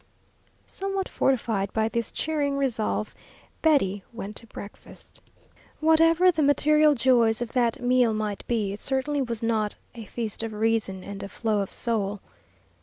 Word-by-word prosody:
Somewhat 390 0 -3
fortified 220 -7 0
by 220 0 +1
this 230 0 -2
cheering 290 -3 -1
resolve, 230 -5 -1 0.5
Betty 205 - +2
went 210 -3 -7
to 230 - -3
breakfast. 205 -1 -12 0.6
Whatever 330 +3 +5
the 320 -2 -1
material 300 +1 +4
joys 235 -2 +3
of 240 -1 -4
that 240 -3 +1
meal 245 -1 +3
might 215 -2 -3
be, 215 -5 0
it 205 - -7
certainly 275 +3 -1
was 235 -3 -3
not 220 -2 0 0.2
"a 230 -3 -9
feast 225 -1 -4
of 225 -1 -4
reason 215 -3 0
and 200 0 -7
a 200 - -6
flow 220 -1 -1
of 195 - -3
soul." 205 -3 -2
230 Hz, 150 wpm, -26 LUFS, 215-280 Hz, 0.6 s, Whatever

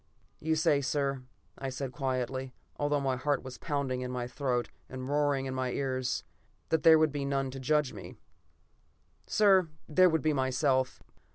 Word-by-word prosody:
"You 160 +1 0
say, 155 -3 +3
sir," 135 0 -1 0.4
I 135 - -3
said 130 0 -4
quietly, 130 -1 -2 0.2
although 145 0 +1
my 135 -2 0
heart 145 +2 0
was 130 -1 -9
pounding 140 -4 -2
in 125 - -3
my 125 -1 -3
throat, 125 -1 -1 0.2
and 130 0 -6
roaring 145 -1 +1
in 130 - -3
my 130 -1 -1
ears, 130 -2 -1 0.5
"that 160 - +2
there 160 -1 +8
would 155 -1 +3
be 145 -1 -3
none 135 -1 -1
to 135 - -7
judge 150 +1 +1
me. - - -9 1.1
"Sir, 195 -5 +4 0.2
there 185 +4 +5
would 160 -1 0
be 155 -1 +2
myself. 130 -1 +1
135 Hz, 170 wpm, -30 LUFS, 130-150 Hz, 1.1 s, there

